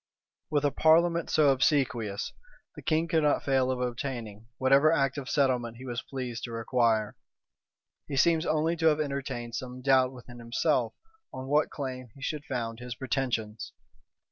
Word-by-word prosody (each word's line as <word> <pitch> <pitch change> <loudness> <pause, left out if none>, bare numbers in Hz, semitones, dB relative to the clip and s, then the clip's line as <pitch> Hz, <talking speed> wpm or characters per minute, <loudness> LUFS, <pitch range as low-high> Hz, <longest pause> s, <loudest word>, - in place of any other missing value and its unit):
With 145 -1 +1
a 145 - +3
parliament 170 +2 +3
so 150 -2 +4
obsequious, 130 -6 +1 0.4
the - - -9
king 160 +2 +1
could 165 -2 +2
not 150 -1 +2
fail 130 -2 +2
of 130 -1 -1
obtaining 120 -4 -4
whatever 135 +4 +5
act 135 -4 +1
of 135 - -7
settlement 125 -5 +1
he 130 - -10
was 120 -2 -3
pleased 125 -3 -6
to 120 - -8
require. 115 -2 +1 0.9
He 140 - -4
seems 160 +2 +4
only 155 +2 +1
to 160 - +2
have 155 -1 +3
entertained 135 -5 -3
some 125 +1 -6
doubt 130 -1 +4
within 120 -1 -12
himself 120 +1 0 0.4
on 130 - -7
what 145 +2 +2
claim 130 -3 -6
he 135 - -15
should 150 +1 -3
found 115 -3 -4
his 120 0 -6
pretensions. 120 -5 -3
130 Hz, 165 wpm, -28 LUFS, 120-145 Hz, 0.9 s, whatever